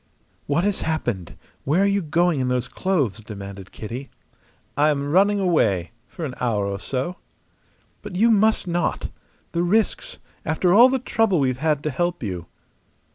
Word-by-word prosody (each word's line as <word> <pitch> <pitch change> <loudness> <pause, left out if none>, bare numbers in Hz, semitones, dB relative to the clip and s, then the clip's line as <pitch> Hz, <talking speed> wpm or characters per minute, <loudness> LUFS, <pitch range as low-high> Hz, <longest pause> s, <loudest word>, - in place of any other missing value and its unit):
"What 145 +5 +1
has 205 0 0
happened? 120 - -2 0.3
Where 160 +8 +2
are - - +4
you 200 0 +2
going 170 -1 +1
in 130 - 0
those 125 0 0
clothes?" 140 - 0
demanded 100 -3 -9
Kitty. 120 +5 -7 0.7
"I 150 +2 +4
am 145 -1 -1
running 200 +4 +4
away 110 - +1 0.2
for 170 - -6
an 135 - -5
hour 110 -5 +1
or 100 0 -3
so." 135 - -3 0.8
"But - - -8
you 230 +5 +4
must 220 0 +3
not! 175 0 -1 0.4
The 170 - 0
risks 205 +5 0 0.3
after 170 +3 +1
all 240 +5 +8
the 265 - +1
trouble 225 -7 +1
we've 130 -2 0
had 150 -1 0
to 150 - -1
help 175 0 -1
you!" 90 -5 -4
155 Hz, 165 wpm, -23 LUFS, 125-185 Hz, 0.8 s, all